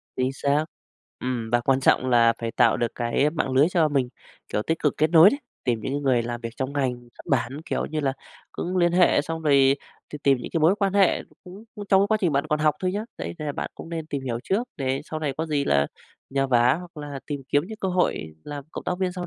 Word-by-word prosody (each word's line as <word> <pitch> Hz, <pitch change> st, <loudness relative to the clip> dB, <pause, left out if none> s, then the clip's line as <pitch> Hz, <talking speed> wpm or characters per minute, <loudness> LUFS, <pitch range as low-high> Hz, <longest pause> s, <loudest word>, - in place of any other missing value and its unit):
Chính 130 Hz, +1 st, 0 dB
xác, 145 Hz, +3 st, +1 dB, 0.6 s
ừm, 120 Hz, -3 st, -3 dB
và 120 Hz, 0 st, +3 dB
quan 135 Hz, +2 st, +2 dB
trọng 130 Hz, -, +3 dB
là 115 Hz, -1 st, +5 dB
phải 115 Hz, -1 st, -3 dB
tạo 120 Hz, -, +4 dB
được 120 Hz, -1 st, -1 dB
cái 120 Hz, +5 st, +1 dB
mạng 150 Hz, -5 st, -2 dB
lưới 135 Hz, +4 st, +5 dB
cho 170 Hz, -4 st, +2 dB
mình, 135 Hz, -4 st, 0 dB, 0.4 s
kiểu, 105 Hz, -, 0 dB
tích 160 Hz, +6 st, -1 dB
cực 150 Hz, -, 0 dB
kết 155 Hz, +1 st, +2 dB
nối 170 Hz, +4 st, +8 dB
đấy. 280 Hz, -, -2 dB, 0.3 s
Tìm 120 Hz, -3 st, 0 dB
những 130 Hz, -, -4 dB
cái 145 Hz, -, -1 dB
người 130 Hz, -4 st, +2 dB
làm 120 Hz, 0 st, -4 dB
việc 115 Hz, -1 st, -5 dB
trong 130 Hz, +1 st, -3 dB
ngành 135 Hz, -3 st, 0 dB, 0.2 s
xuất -, -, -13 dB
bản, 135 Hz, +6 st, 0 dB
kiểu -, -, -2 dB
như 155 Hz, 0 st, -3 dB
là, 135 Hz, -2 st, 0 dB, 0.4 s
cũng 180 Hz, +2 st, -3 dB
liên 175 Hz, -1 st, +3 dB
hệ 175 Hz, -4 st, +4 dB
xong 160 Hz, +1 st, -5 dB
rồi 140 Hz, -2 st, +5 dB, 0.4 s
t -, -, -4 dB
tìm 135 Hz, -2 st, +4 dB
những -, -, -7 dB
cái 165 Hz, -, 0 dB
mối 165 Hz, +5 st, +5 dB
quan 195 Hz, -2 st, +1 dB
hệ 195 Hz, -3 st, +4 dB
nó -, -, -25 dB
cũng, 190 Hz, +5 st, -11 dB
ưm, 205 Hz, -2 st, -7 dB
trong 190 Hz, 0 st, +5 dB
cái 200 Hz, -, +3 dB
quá 220 Hz, -, +3 dB
trình 175 Hz, -6 st, +1 dB
bạn 140 Hz, +2 st, +1 dB
còn 150 Hz, -1 st, +1 dB
học 150 Hz, -1 st, +3 dB
thôi 185 Hz, 0 st, 0 dB
nhá, 210 Hz, +2 st, -3 dB
đấy, -, -, -5 dB
nên 155 Hz, -, -5 dB
là 145 Hz, -, -2 dB
bạn -, -, -4 dB
cũng -, -, -10 dB
nên 165 Hz, -2 st, -5 dB
tìm 140 Hz, -3 st, -4 dB
hiểu 120 Hz, -2 st, -2 dB
trước 225 Hz, +6 st, 0 dB
để 135 Hz, -1 st, -1 dB
sau 155 Hz, 0 st, -5 dB
này 145 Hz, -3 st, -1 dB
có 160 Hz, +1 st, -2 dB
gì 145 Hz, -2 st, 0 dB
là 70 Hz, 0 st, +2 dB, 0.4 s
nhờ 135 Hz, 0 st, +1 dB
vả, 125 Hz, 0 st, +4 dB
hoặc 175 Hz, -2 st, -12 dB
là 140 Hz, -1 st, -6 dB
tìm 145 Hz, -2 st, -4 dB
kiếm 145 Hz, -, +3 dB
những 220 Hz, 0 st, -8 dB
cơ 190 Hz, -, -1 dB
hội 175 Hz, -, 0 dB
làm 145 Hz, -2 st, -6 dB
cộng -, -, -7 dB
tác 180 Hz, -, -2 dB
viên 185 Hz, -1 st, 0 dB
sau 180 Hz, -1 st, -5 dB
145 Hz, 270 wpm, -24 LUFS, 130-170 Hz, 0.6 s, nối